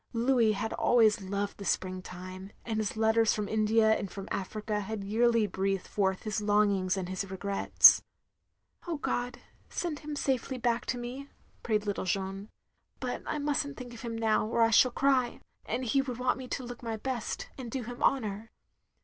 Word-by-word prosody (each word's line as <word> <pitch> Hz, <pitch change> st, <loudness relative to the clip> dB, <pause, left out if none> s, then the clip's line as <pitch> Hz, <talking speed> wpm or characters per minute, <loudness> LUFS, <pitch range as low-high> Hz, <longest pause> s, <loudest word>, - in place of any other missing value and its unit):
Louis 235 Hz, -2 st, +3 dB
had 215 Hz, +2 st, -3 dB
always 220 Hz, -3 st, +4 dB
loved 200 Hz, +2 st, -3 dB
the -, -, -6 dB
spring 185 Hz, -1 st, -1 dB
time; 185 Hz, +1 st, -9 dB, 0.2 s
and 220 Hz, -2 st, -1 dB
his 215 Hz, 0 st, -2 dB
letters 220 Hz, 0 st, +3 dB
from 210 Hz, -1 st, -2 dB
India 220 Hz, +1 st, +3 dB
and 200 Hz, -, -4 dB
from 195 Hz, +1 st, -8 dB
Africa 210 Hz, +2 st, -2 dB
had 210 Hz, 0 st, -4 dB
yearly 230 Hz, +2 st, +3 dB
breathed 195 Hz, -1 st, -1 dB
forth 190 Hz, -2 st, 0 dB
his 215 Hz, -1 st, -2 dB
longings 205 Hz, -3 st, +2 dB
and 185 Hz, -2 st, -3 dB
his 185 Hz, +1 st, -4 dB
regrets. 195 Hz, +1 st, +5 dB, 0.4 s
" -, -, -30 dB
Oh 335 Hz, -3 st, -2 dB
God, 245 Hz, -3 st, -2 dB, 0.3 s
send 325 Hz, -4 st, -3 dB
him 300 Hz, -1 st, -6 dB
safely 265 Hz, -2 st, -1 dB
back 235 Hz, -1 st, 0 dB
to 250 Hz, -, -1 dB
me, 250 Hz, +4 st, -6 dB, 0.2 s
" -, -, -34 dB
prayed 215 Hz, -2 st, 0 dB
little 205 Hz, -2 st, -2 dB
Jeanne, 195 Hz, +2 st, -2 dB, 0.5 s
"but -, -, -3 dB
I -, -, -1 dB
must 290 Hz, -1 st, +1 dB
n't 285 Hz, -, -9 dB
think 245 Hz, -1 st, -8 dB
of 235 Hz, -, -10 dB
him 230 Hz, -2 st, -4 dB
now, 220 Hz, -1 st, +2 dB
or 230 Hz, +1 st, +2 dB
I 225 Hz, -, +3 dB
shall 255 Hz, +3 st, +6 dB
cry, 255 Hz, -1 st, +1 dB, 0.3 s
and 250 Hz, +3 st, -2 dB
he 270 Hz, +4 st, +3 dB
would 255 Hz, -3 st, -5 dB
want 250 Hz, +1 st, 0 dB
me 255 Hz, -, -7 dB
to 260 Hz, -, -3 dB
look 245 Hz, 0 st, -8 dB
my 225 Hz, -2 st, -3 dB
best, 245 Hz, 0 st, -4 dB
and 255 Hz, -3 st, -7 dB
do 255 Hz, +2 st, -3 dB
him 245 Hz, +2 st, -8 dB
honour." 220 Hz, -4 st, 0 dB
220 Hz, 195 wpm, -30 LUFS, 200-245 Hz, 0.5 s, shall